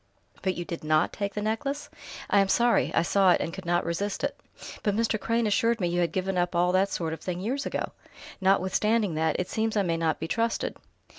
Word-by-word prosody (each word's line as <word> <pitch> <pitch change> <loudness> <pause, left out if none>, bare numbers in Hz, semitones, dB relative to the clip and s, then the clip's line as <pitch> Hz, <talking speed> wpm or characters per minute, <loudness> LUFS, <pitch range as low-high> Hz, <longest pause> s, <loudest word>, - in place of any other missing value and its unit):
"But 185 -1 0
you 175 - -4
did 170 -2 -6
not 155 +1 +2
take 200 -1 -3
that 210 - -2
necklace!" 275 +7 -2 0.4
"I 200 - +4
am 195 - +3
sorry.... 235 +4 +3
I 165 - +4
saw 195 +1 +3
it, - - +1
and 165 - -3
could 190 -2 -8
not 175 0 +1
resist 195 +4 -2
it." - - -1 0.5
"But 205 -2 0
Mr. 225 -1 +1
Crane 230 +2 0
assured 230 +2 +2
me 175 -3 0
you 175 +1 0
had 170 - +1
given 190 0 -1
up 175 0 0
all 175 +1 +3
that 190 +2 +3
sort 165 -4 -2
of 160 - -7
thing 180 -1 -3
years 255 +9 -2
ago!" - - -3 0.5
"Notwithstanding 195 +2 +2
that, 160 0 0
it 180 - -1
seems 220 0 -1
I 200 - +3
may 165 -2 0
not 160 -1 0
be 160 - -3
trusted...." 230 +5 -1
190 Hz, 230 wpm, -27 LUFS, 175-220 Hz, 0.5 s, I